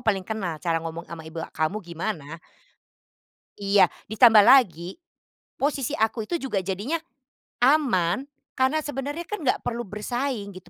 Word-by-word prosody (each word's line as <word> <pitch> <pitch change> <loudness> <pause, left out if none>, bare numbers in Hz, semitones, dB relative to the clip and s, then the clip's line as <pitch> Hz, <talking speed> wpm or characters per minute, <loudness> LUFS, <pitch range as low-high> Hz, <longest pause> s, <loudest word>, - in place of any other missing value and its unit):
paling 200 -5 0
kenal 195 -6 -3
cara 165 +1 -1
ngomong 165 +1 -6
sama 165 -1 -8
ibu 165 +1 -8
kamu 160 +6 -1
gimana". 165 -3 -5 1.2
Iya, 200 0 +4 0.2
ditambah 220 -1 +7
lagi, 190 - +4 0.7
posisi 280 -2 -1
aku 220 0 0
itu 340 +9 -2
juga 210 -8 -2
jadinya 205 - -2 0.7
aman, 250 - +3 0.3
karena 265 +4 +2
sebenarnya 290 +4 -4
kan 420 -4 -5
nggak 255 - 0
perlu 240 0 -2
bersaing 210 0 -3
gitu, 180 -1 -13
210 Hz, 135 wpm, -25 LUFS, 175-265 Hz, 1.2 s, ditambah